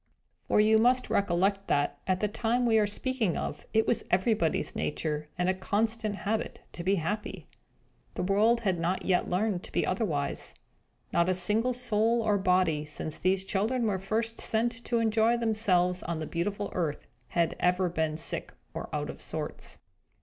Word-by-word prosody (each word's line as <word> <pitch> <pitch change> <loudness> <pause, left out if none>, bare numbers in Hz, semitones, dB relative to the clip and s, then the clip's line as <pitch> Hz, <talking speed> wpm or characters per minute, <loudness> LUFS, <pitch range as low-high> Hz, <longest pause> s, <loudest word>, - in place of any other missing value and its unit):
For - - +3
you 220 +1 +5
must 250 +2 +2
recollect 195 +1 +1
that, 145 0 0
at 185 -1 +1
the 210 - +2
time 235 +4 0
we 225 -2 +4
are 210 - +2
speaking 220 -3 -1
of, 150 - -5
it 220 0 +3
was 240 - +1
everybody's 185 -2 +1
nature, 150 0 -2
and 185 +1 0
constant 215 +2 0
habit, 215 +2 -2
to 170 - -6
be 195 +3 +2
happy. 205 +5 -3 0.7
The - - -2
world 215 +5 +3
had 190 -5 0
not 175 +3 -1
yet 185 -2 +1
learned 185 0 0
to - - -12
be - - +1
otherwise. 165 -8 -2 0.6
Not 170 +1 +3
a 185 - +2
single 210 +7 +2
soul 235 -1 +1
or 210 -2 +2
body, 180 -5 +2
since 155 0 -5
these 190 +1 +1
children 220 +6 0
were 200 -3 0
first 225 +4 -1
sent 230 +2 +1
to 235 - +1
enjoy 225 +1 +3
themselves 195 -6 +2
on 170 0 -3
the 155 - -4
beautiful 200 +5 -3
earth, 160 -5 -2 0.2
had 170 -1 0
ever 180 +1 +2
been 160 -2 -1
sick 160 - -3 0.2
or - - -5
out - - -2
of - - -12
sorts. - - -5
200 Hz, 170 wpm, -29 LUFS, 180-220 Hz, 0.7 s, you